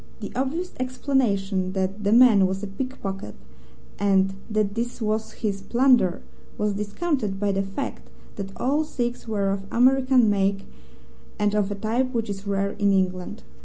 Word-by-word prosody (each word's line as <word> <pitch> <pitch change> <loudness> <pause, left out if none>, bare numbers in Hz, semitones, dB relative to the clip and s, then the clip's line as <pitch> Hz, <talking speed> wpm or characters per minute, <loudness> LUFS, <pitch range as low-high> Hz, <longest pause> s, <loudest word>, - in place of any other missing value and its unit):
The - - -6
obvious 310 +8 -2
explanation 210 -8 0
that 195 +2 -2
the 200 - +2
man 225 -5 +7
was 190 +2 -4
a - - -1
pickpocket, 195 - -5 0.6
and 195 -1 +3 0.2
that 210 -2 0
this 235 +3 -3
was 220 -1 -1
his 200 -3 -3
plunder, 240 -5 +3 0.3
was 210 -1 0
discounted 210 - -2
by 205 0 +1
the 195 0 0
fact 195 +7 -5 0.3
that 195 -1 -5
all 285 +5 +1
six 245 -6 -3
were 200 -3 0
of 195 0 -4
American 260 0 +4
make 195 -1 +1 0.7
and 210 -1 +1
of 210 -2 +1
a 205 - -3
type 235 +6 -1
which 225 -2 -1
is 200 0 -7
rare 200 0 0
in 200 -1 +1
England. 185 +2 -1
205 Hz, 160 wpm, -24 LUFS, 195-245 Hz, 0.7 s, man